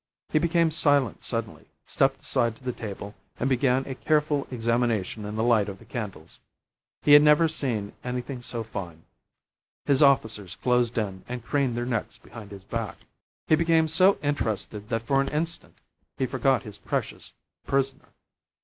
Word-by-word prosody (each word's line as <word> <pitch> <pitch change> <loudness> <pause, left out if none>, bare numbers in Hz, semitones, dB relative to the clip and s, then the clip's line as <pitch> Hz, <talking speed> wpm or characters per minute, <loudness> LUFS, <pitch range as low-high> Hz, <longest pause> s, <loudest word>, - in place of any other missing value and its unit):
He 155 - +2
became 165 0 +2
silent 145 - +2
suddenly, - - -4 0.2
stepped - - +1
aside 115 -2 +1
to 130 - -21
the 125 - -1
table, 100 -2 -7 0.3
and 125 - 0
began 130 0 +2
a 135 - -4
careful 150 0 +1
examination 115 -4 -1
in 105 +1 -5
the 110 - 0
light 110 -4 +3
of 95 - -7
the - - -17
candles. 105 -10 -7 0.6
He 145 - +6
had 145 - +10
never 150 +2 +5
seen 120 -10 -3
anything 125 +1 -4
so 120 -1 -4
fine. 85 -7 -7 0.8
His 140 0 +3
officers 110 - +3
closed 125 -2 +1
in 95 -4 -2
and 125 -2 -5
craned 135 -5 0
their 120 - -1
necks 115 -3 -3
behind 110 -3 -12
his 100 -2 -10
back. 115 +1 -4 0.5
He - - +2
became 165 0 +3
so 185 +5 +4
interested 110 -6 -2
that 115 -1 -1
for 135 +2 +3
an 140 - -1
instant 160 +2 -3 0.4
he 130 - +1
forgot 135 0 +1
his 105 -4 -10
precious - - -4 0.3
prisoner. 135 -1 -1
125 Hz, 165 wpm, -26 LUFS, 110-145 Hz, 0.8 s, had